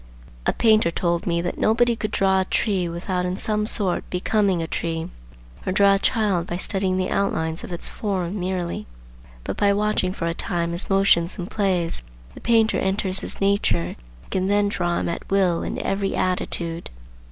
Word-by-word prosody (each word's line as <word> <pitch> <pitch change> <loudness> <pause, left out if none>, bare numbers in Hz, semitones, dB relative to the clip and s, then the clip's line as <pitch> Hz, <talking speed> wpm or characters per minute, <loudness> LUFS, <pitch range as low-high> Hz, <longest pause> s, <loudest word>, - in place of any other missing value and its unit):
A - - +3
painter 215 -5 +4
told 170 +1 -1
me 170 -1 +1
that 175 - -3
nobody 235 +2 +3
could 215 -1 -3
draw 190 -1 +2
a - - -1
tree 190 -4 0
without 180 +2 -2
in 180 0 -1
some 210 +1 +2
sort 195 -5 0
becoming 195 0 +1
a 165 - -1
tree; 165 0 -3 0.6
or - - -2
draw 200 +1 +5
a 195 - +2
child 200 -7 +1
by 175 - -3
studying 190 0 0
the 185 0 -1
outlines 160 -5 -1
of - - -7
its 175 - 0
form 195 -2 -2
merely,—but, - - -6
by 205 -1 +3
watching 205 -2 +1
for 185 - -4
a 170 - 0
time 170 0 -1
his 170 +2 +1
motions 195 -3 +3
and 180 0 -6
plays, 185 -5 0 0.3
the - - -12
painter 225 -1 +3
enters 190 0 0
into - - -5
his - - -4
nature 195 - +2
and - - -8 0.4
can 185 0 0
then 205 0 +2
draw 175 -3 -1
him - - -1
at 170 - -5
will 185 -4 +2
in - - -4
every 195 0 -1
attitude. 170 -2 -1
185 Hz, 185 wpm, -23 LUFS, 170-200 Hz, 0.6 s, draw